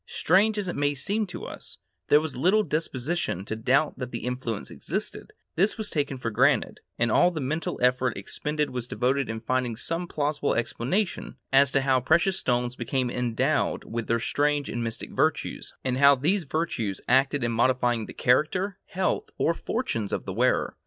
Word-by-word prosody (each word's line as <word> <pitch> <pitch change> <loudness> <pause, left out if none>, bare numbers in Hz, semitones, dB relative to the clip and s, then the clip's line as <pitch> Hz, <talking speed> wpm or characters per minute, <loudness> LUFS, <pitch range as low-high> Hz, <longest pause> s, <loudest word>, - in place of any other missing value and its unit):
Strange 205 +5 +2
as 205 -2 -2
it 175 - -3
may 145 0 +1
seem 205 +10 -1
to 175 - -7
us, - - -9 0.3
there 145 - +6
was 155 -2 -4
little 190 +11 +3
disposition 150 - -2
to 110 - -3
doubt 130 +7 +1
that 125 -2 -4
the 120 -1 -5
influence 125 -3 -4
existed; - - -4 0.2
this 195 +8 +2
was 220 -2 -2
taken 145 -3 -1
for 115 -2 -3
granted, - - +2 0.2
and 115 -1 +1
all 175 - +5
the 170 -3 -5
mental 155 +4 -2
effort 125 -2 +2
expended 150 +9 -2
was 125 -1 -4
devoted 130 +3 0
to 110 0 -4
finding 125 0 -1
some 165 +9 -3
plausible 145 -2 -1
explanation 135 - -2 0.2
as 135 0 +6
to 135 - +2
how 135 -1 +3
precious 170 +8 +2
stones 125 0 0
became 125 +1 -1
endowed 120 -2 0
with 115 0 -5
their 115 0 +1
strange 145 +4 0
and 120 0 -3
mystic 115 -1 -5
virtues, - - -1
and 130 0 -1
how 140 0 +7
these 165 +7 0
virtues 130 - -2
acted 135 +2 +3
in 120 - 0
modifying 120 -1 +1
the - - -9
character, 180 +10 +1
health, 185 +1 -1
or 165 - +2
fortunes 165 - -3
of - - -3
the 95 - -4
wearer. 125 +5 +1
135 Hz, 180 wpm, -26 LUFS, 120-160 Hz, 0.3 s, how